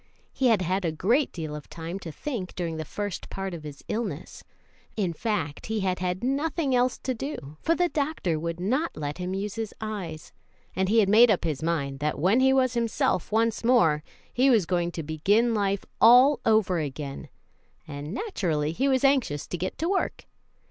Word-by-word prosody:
He 265 - +2
had 220 -6 +3
had 185 +3 0
a 165 - 0
great 230 - +1
deal 155 -3 -5
of 150 - -9
time 170 +3 -6
to 170 -4 -7
think 215 - -5
during 165 -3 -3
the 160 - -4
first 205 +4 -5
part 195 -1 -4
of 170 - -6
his 150 -2 -10
illness 200 -8 -4 0.5
in 185 -5 0
fact, 165 -6 -3
he 220 -1 -1
had 185 -1 0
had 180 +2 -2
nothing 280 +2 0
else 250 0 +2
to 260 - -3
do, 220 - -6
for 330 - +2
the 355 0 +2
doctor 280 - -1
would 170 +1 -4
not 260 - -1
let 150 +2 -4
him 180 +1 -3
use 200 +1 -3
his 225 -2 -5
eyes 190 -8 -6 0.4
and 190 +1 0
he 225 +1 +5
had 200 - +2
made 225 +4 +7
up 200 - +2
his 155 -4 -2
mind 140 -5 -1
that 150 +1 -1
when 190 - +3
he 265 0 +5
was 260 -2 +3
himself 230 -6 0
once 225 +1 +1
more 205 -12 +4 0.3
he 260 +2 +4
was 225 -8 +4
going 175 -1 0
to 165 - -4
begin 200 +10 +2
life 200 -2 0 0.2
all 250 +5 +7
over 215 -5 +3
again, 145 -2 -5 0.6
and 145 +1 -6
naturally 170 - -1
he 265 +12 0
was 265 -1 +2
anxious 265 - +2
to - - -5
get 180 +2 -4
to 330 - -1
work. 380 +1 -1
195 Hz, 195 wpm, -26 LUFS, 165-240 Hz, 0.6 s, made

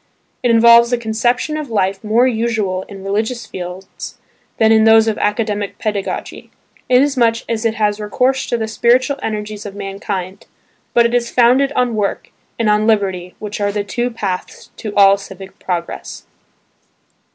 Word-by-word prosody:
It 245 - +1
involves 235 +1 +6
a 245 - +2
conception 240 +6 -1
of 300 -4 -5
life 195 -2 -1
more 220 +4 +3
usual 220 -6 -1
in 195 -2 -10
religious 220 +4 -2
fields 185 0 -8 0.4
than 220 -1 +4
in 220 0 +5
those 225 0 +6
of 220 - -1
academic 210 -1 -1
pedagogy, 205 -3 -4 0.4
inasmuch 250 -3 +2
as 230 0 -2
it 225 -1 +1
has 210 -1 0
recourse 255 +5 0
to 240 - 0
the 220 -1 -3
spiritual 250 +5 +2
energies 210 -1 -4
of 200 -2 -8
mankind, 195 -1 -5 0.5
but 235 -1 +5
it 235 - 0
is 240 -1 +1
founded 255 +3 +3
on 250 -3 +1
work 205 -2 -2 0.3
and 230 - 0
on 210 +1 +2
liberty 190 -5 0
which 210 0 -6
are 205 0 +1
the 205 0 -2
two 240 +5 -2
paths 200 -6 -5
to 215 - -5
all 200 0 +6
civic 195 -1 -11
progress. 175 -2 -5
220 Hz, 160 wpm, -17 LUFS, 200-235 Hz, 0.5 s, involves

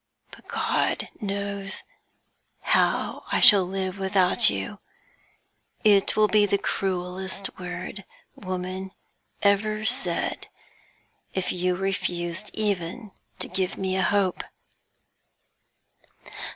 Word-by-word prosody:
But - - -15
God - - 0
knows 200 -1 -4 0.8
how - - +1
I - - +2
shall 200 -2 +9
live 190 +1 -3
without 190 -1 +4
you; 95 -1 -4 1.0
it 205 -2 +4
would 215 0 +4
be 210 -1 +5
the 200 - +2
cruelest 190 0 -3
word 180 +2 -6 0.3
woman 185 0 -5 0.5
ever 215 +1 +2
said 175 -4 0 0.9
if 190 -1 -1
you 180 0 0
refused 180 -1 -2
even 205 +1 -2 0.3
to - - -4
give 190 -1 -2
me 190 -1 -1
a 190 - +1
hope.' 195 -2 +1
190 Hz, 100 wpm, -25 LUFS, 180-200 Hz, 1.0 s, shall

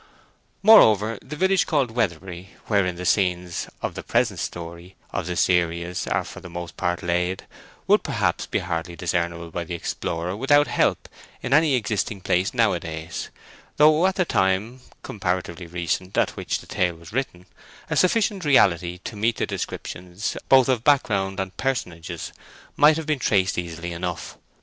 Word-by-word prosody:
Moreover, 110 - +6
the 150 - -8
village 190 +4 +2
called 140 -7 +1
Weatherbury, 95 -4 -3
wherein 100 -4 +1
the 90 +1 -6
scenes 90 -3 0
of - - -2
the - - -6
present 115 -6 0
story 85 +4 -7 0.2
of - - -3
the 90 - -2
series 85 0 +1
are - - 0
for - - -10
the 90 - -11
most 85 0 -7
part 90 -1 -2
laid, 90 +2 -1 0.4
would - - +4
perhaps - - -1
be - - -1
hardly 85 -1 -3
discernible 85 -1 -2
by 85 +1 -3
the 85 +1 -5
explorer, 85 +1 -3
without 145 +6 +4
help, - - 0 0.4
in 125 - -1
any 150 -2 +5
existing 105 -3 -1
place 95 +1 +1
nowadays; 85 -9 -1 0.5
though 155 +4 +5
at 190 - -1
the 185 - +1
time, 95 - 0 0.2
comparatively 90 -3 -3
recent, 90 +2 -3
at - - +3
which - - -3
the - - -14
tale 90 -4 0
was 85 +3 -14
written, 115 -9 -3 0.4
a - - -2
sufficient 200 0 +2
reality 90 - +3
to 110 - -6
meet 110 +3 0
the - - 0
descriptions, 90 +3 -5
both 130 -2 +6
of 125 -4 +1
backgrounds 100 -9 +2
and 95 -1 -4
personages, 85 -11 -3 0.4
might 150 +1 +6
have 160 - -4
been 155 -2 0
traced 100 -5 +2
easily 85 0 -5
enough. 85 -1 -5
95 Hz, 160 wpm, -24 LUFS, 85-120 Hz, 0.5 s, Moreover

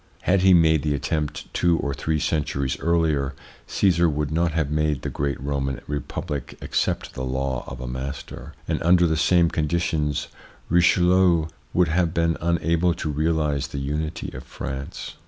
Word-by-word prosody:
Had 95 0 +3
he 95 0 +6
made 80 -4 +5
the 75 -1 0
attempt 75 +1 -3
two 85 -1 +2
or 70 -3 -2
three 80 +3 -1
centuries 70 -4 -1
earlier, 80 -5 +1 0.3
Caesar 85 -3 +3
would 75 0 -2
not 85 +1 +1
have 80 -2 -1
made 75 -3 0
the - - -3
great 70 -2 -2
Roman 70 -1 -2
Republic 75 -1 -5
accept - - -1
the 65 - -5
law 65 -1 -2
of 60 - -7
a 65 - -5
master, 65 +2 -6
and - - -1
under 90 +1 +5
the 80 -1 +1
same 85 +1 +3
conditions 75 -2 0 0.4
Richelieu 90 -1 +4 0.2
would 90 -2 +2
have 85 0 +1
been 85 -1 +2
unable 85 0 +1
to 80 -3 -3
realise 75 -2 0
the - - -7
unity 75 +4 -3
of - - -7
France. 65 +1 -6
75 Hz, 160 wpm, -24 LUFS, 70-85 Hz, 0.4 s, he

